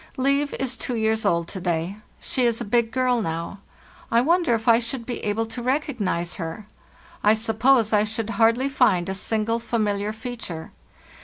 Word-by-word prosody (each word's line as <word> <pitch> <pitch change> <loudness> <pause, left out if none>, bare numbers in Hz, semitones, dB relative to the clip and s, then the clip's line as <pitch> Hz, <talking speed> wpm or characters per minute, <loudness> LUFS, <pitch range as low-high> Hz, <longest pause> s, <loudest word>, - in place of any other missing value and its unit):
" - - -27
Liv 280 +2 +1
is 260 -1 -2
two 250 - -3
years 220 0 +1
old 170 -1 +1
to 190 - -6
day. 175 +2 -1 0.2
"She 260 - -2
is 235 -2 +2
a - - -4
big 230 +2 +2
girl 250 -1 +1
now. 165 +2 -4 0.5
I 230 - +4
wonder 335 0 +3
if 225 +1 -5
I 230 0 +6
should 235 0 -4
be 245 - -4
able 210 +2 0
to 225 +2 -7
recognize 245 - -1
her? 165 +4 -5 0.6
I 210 +1 +5
suppose 225 +1 +2
I 210 0 +5
should 220 +1 -3
hardly 230 +4 +3
find 185 -10 +2
a - - -1
single 220 +3 -1
familiar 210 -3 -1
feature. 220 -8 -7
225 Hz, 180 wpm, -24 LUFS, 205-245 Hz, 0.6 s, I